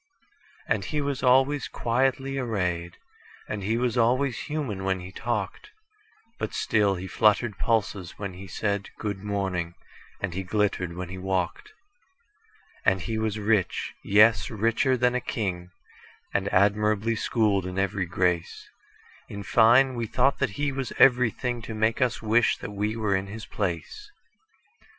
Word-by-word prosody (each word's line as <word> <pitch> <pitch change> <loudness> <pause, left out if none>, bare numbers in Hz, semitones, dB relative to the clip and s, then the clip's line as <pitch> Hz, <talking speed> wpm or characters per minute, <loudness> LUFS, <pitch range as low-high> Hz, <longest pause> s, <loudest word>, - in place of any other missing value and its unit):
And - - 0
he 150 - -2
was 140 -2 -2
always 135 +2 +3
quietly 135 +3 0
arrayed, 90 -8 -2 0.5
And 105 - -4
he 110 +4 0
was 120 -1 0
always 125 +2 +2
human 135 -11 -3
when 95 -1 0
he 90 +1 -9
talked; 105 -2 -3 0.7
But - - -3
still 105 -3 +2
he 90 +1 -6
fluttered 105 +3 +2
pulses 100 -5 -1
when 100 -3 -5
he 95 +2 -10
said,"Good 100 +1 -3
morning," 95 -4 -2 0.4
and 95 -3 -3
he 95 - -2
glittered 95 -2 -1
when 90 -1 -5
he 95 0 -7
walked. 95 - -2 1.1
And 95 -1 +2
he 110 +2 -3
was 110 -1 -1
rich,—yes, 105 0 +2
richer 115 +4 +1
than 125 0 +2
a 125 - 0
king,—And 95 0 -5
admirably 105 +3 +2
schooled 105 -5 +1
in 90 0 -6
every 95 -1 0
grace:In 90 +3 -4
fine, 120 +5 +5
we 120 -2 -3
thought 130 +5 +2
that 140 - +1
he 145 -1 0
was 135 -2 -3
everythingTo 120 -2 +2
make 110 +4 +1
us 125 -3 0
wish 110 +2 +3
that - - -7
we 105 +2 -2
were 105 -3 0
in 95 +1 -2
his 110 +2 -7
place. 100 - -4
105 Hz, 140 wpm, -26 LUFS, 95-120 Hz, 1.1 s, fine